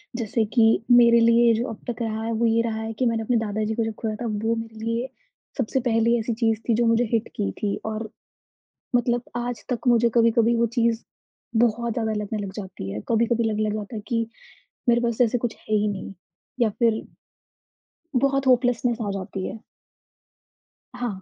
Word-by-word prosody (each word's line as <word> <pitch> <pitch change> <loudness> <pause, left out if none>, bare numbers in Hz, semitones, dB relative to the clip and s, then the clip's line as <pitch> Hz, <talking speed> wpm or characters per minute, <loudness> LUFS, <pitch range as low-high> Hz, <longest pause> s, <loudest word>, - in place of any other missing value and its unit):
जैसे 225 -1 0
कि 230 - +6 0.3
मेरे 235 -1 +7
लिए 230 0 +5
जो 245 - -1
अब 220 - -9
तक 240 0 -4
रहा 220 -1 -2
है 230 - -2
वो - - +4
ये 230 0 +3
रहा 220 -1 -2
है 225 0 -4
कि 255 - +2
मैंने 225 -1 +1
अपने 240 +1 +1
दादा 215 -1 -1
जी 220 - -1
को 230 - 0
जब 225 - -3
खोया 220 -2 -2
था - - -2
वो 225 +1 0
मेरे 225 0 -6
लिए 230 +2 -1 0.5
सबसे 265 0 0
पहली 230 +1 +3
ऐसी 230 +1 -2
चीज़ 225 -1 +1
थी। - - +5
जो 235 +1 +2
मुझे 230 +1 +3
हिट 225 0 +1
की 95 - -1
थी। 205 -1 0
और 220 0 -4 0.9
मतलब 240 0 +2 0.2
आज 240 0 -4
तक 250 0 -2
मुझे 235 -1 +4
कभी-कभी 230 0 +4
वो 235 - +3
चीज़ 230 -1 +2 0.6
बहुत 235 0 -1
ज़्यादा 220 -2 -1
लगने 215 +1 -4
लग 190 - -6
जाती 185 - -7
है। 105 - -4
कभी-कभी 235 +1 +2
लगने 215 0 0
लग - - -2
जाता 215 +2 -6
है 210 - -4
कि 230 -2 0 0.6
मेरे 240 0 +4
पास 235 -2 -1
जैसे 245 0 +3
कुछ 235 -1 -3
है 215 - -2
ही 210 0 +2
नहीं 200 -1 -4 0.5
या 230 - +4
फ़िर 225 +1 +1 1.2
बहुत 275 -1 +1
होपलेस्नेस 245 -1 +3
आ - - -1
जाती 190 -1 -4
है। 220 - -7 1.3
हाँ। 235 -6 -4
230 Hz, 200 wpm, -24 LUFS, 220-235 Hz, 1.3 s, मेरे